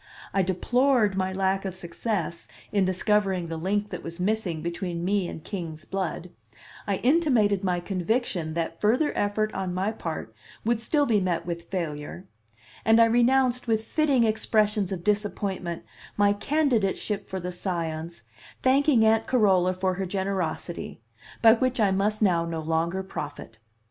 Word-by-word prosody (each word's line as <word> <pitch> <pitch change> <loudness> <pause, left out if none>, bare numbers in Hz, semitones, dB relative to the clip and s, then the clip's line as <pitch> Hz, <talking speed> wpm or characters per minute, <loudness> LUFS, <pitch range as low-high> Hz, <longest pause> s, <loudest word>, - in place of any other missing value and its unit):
I 195 - +3
deplored 220 +4 +2
my 190 0 0
lack 190 0 0
of 190 -2 -4
success 185 0 -4 0.2
in 200 -2 +2
discovering 190 -2 +1
the 165 - -3
link 205 +5 -1
that - - -5
was 170 +1 -8
missing 185 -5 -1
between 170 0 -3
me 195 -1 +1
and 160 - -8
king's 165 -6 -6
blood; 180 -2 -4 0.6
I 200 - +1
intimated 240 - +2
my 180 -2 0
conviction 185 -3 -1
that 165 0 -3
further 250 +9 +2
effort 215 +1 0
on 185 -2 -3
my 190 +4 0
part 160 - -5 0.3
would 235 0 +2
still 290 +6 +2
be 220 -5 +3
met 175 -3 -1
with 170 -1 -5
failure; 165 -2 -4 0.6
and 225 +1 +5
I 230 - +8
renounced 245 +2 +3
with 220 -1 +1
fitting 280 -1 +2
expressions 215 -2 +1
of 180 -3 -4
disappointment 200 -4 -1 0.3
my 205 0 +4
candidateship 215 -6 0
for 190 - -3
the 180 0 -4
Scions 170 - -4 0.4
thanking 265 -3 +4
Aunt 225 0 +3
Carola 190 -7 +3
for 185 0 0
her 190 +1 -3
generosity, 190 -3 -3 0.4
by 225 -1 +9
which 255 +1 0
I 205 -3 +4
must 210 +3 +1
now 175 -4 +3
no 165 -1 -3
longer 165 +4 -1
profit. 145 -10 -7
195 Hz, 155 wpm, -26 LUFS, 175-220 Hz, 0.6 s, by